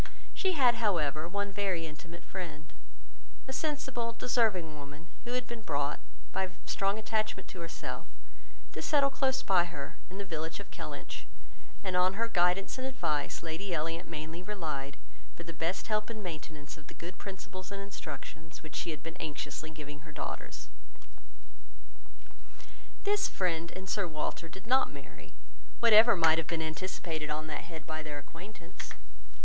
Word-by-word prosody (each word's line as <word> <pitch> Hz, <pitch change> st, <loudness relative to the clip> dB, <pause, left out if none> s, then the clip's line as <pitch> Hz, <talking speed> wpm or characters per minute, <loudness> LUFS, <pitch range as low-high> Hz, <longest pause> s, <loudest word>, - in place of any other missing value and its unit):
She 380 Hz, -2 st, +3 dB
had, 245 Hz, -6 st, +6 dB
however, 155 Hz, -7 st, +3 dB
one 200 Hz, +2 st, 0 dB
very 190 Hz, -4 st, +1 dB
intimate 165 Hz, +2 st, -8 dB
friend, 155 Hz, -5 st, -5 dB, 0.7 s
a 265 Hz, -, -3 dB
sensible, 265 Hz, -5 st, 0 dB
deserving 220 Hz, -9 st, +3 dB
woman, 145 Hz, +3 st, -8 dB, 0.2 s
who 240 Hz, -, -2 dB
had 250 Hz, -1 st, +1 dB
been 235 Hz, -1 st, -5 dB
brought, 145 Hz, -6 st, +1 dB, 0.3 s
by 190 Hz, -1 st, +1 dB, 0.2 s
strong 195 Hz, +1 st, +2 dB
attachment 215 Hz, -2 st, 0 dB
to 185 Hz, -, -7 dB
herself, 165 Hz, -1 st, -4 dB, 0.7 s
to -, -, -3 dB
settle 280 Hz, -2 st, +5 dB
close 265 Hz, -1 st, +3 dB
by 180 Hz, -3 st, +6 dB
her, 155 Hz, -2 st, -5 dB
in 185 Hz, -, -7 dB
the 200 Hz, -, -2 dB
village 160 Hz, -2 st, -2 dB
of -, -, -9 dB
Kellynch; -, -, -5 dB, 0.6 s
and 185 Hz, -2 st, 0 dB
on 180 Hz, +1 st, +6 dB
her 230 Hz, +2 st, +2 dB
kindness 180 Hz, +2 st, +3 dB
and 260 Hz, -, 0 dB
advice, 165 Hz, -, 0 dB
Lady 170 Hz, +3 st, -1 dB
Elliot 165 Hz, +1 st, -1 dB
mainly 160 Hz, +1 st, -4 dB
relied 155 Hz, -8 st, -2 dB, 0.4 s
for 170 Hz, -, -6 dB
the 165 Hz, 0 st, -6 dB
best 165 Hz, +3 st, 0 dB
help 215 Hz, 0 st, +1 dB
and 220 Hz, -2 st, -4 dB
maintenance 155 Hz, -4 st, -5 dB
of 150 Hz, -, -13 dB
the -, -, -10 dB
good 175 Hz, +1 st, -7 dB
principles 190 Hz, -1 st, -6 dB
and 200 Hz, -, -3 dB
instruction 160 Hz, -4 st, -6 dB
which 155 Hz, -1 st, -8 dB
she -, -, 0 dB
had 155 Hz, -2 st, -3 dB
been 165 Hz, -, -5 dB
anxiously 155 Hz, 0 st, -2 dB
giving 150 Hz, -2 st, -7 dB
her 155 Hz, +1 st, -11 dB
daughters. -, -, -4 dB, 2.3 s
This 410 Hz, 0 st, +4 dB
friend, 170 Hz, -2 st, +1 dB
and 190 Hz, +1 st, -5 dB
Sir 200 Hz, 0 st, +2 dB
Walter, 160 Hz, +1 st, -2 dB
did 190 Hz, +4 st, -9 dB
not 260 Hz, +3 st, +5 dB
marry, -, -, -10 dB, 0.5 s
whatever 230 Hz, -1 st, +9 dB
might 165 Hz, -2 st, +7 dB
have 165 Hz, -, -1 dB
been 165 Hz, -, +1 dB
anticipated 160 Hz, -1 st, -2 dB
on 155 Hz, +1 st, 0 dB
that 150 Hz, -, -3 dB
head 160 Hz, -3 st, -7 dB
by 155 Hz, 0 st, -2 dB
their 150 Hz, -2 st, -4 dB
acquaintance. 170 Hz, +4 st, -8 dB
175 Hz, 160 wpm, -33 LUFS, 155-210 Hz, 2.3 s, whatever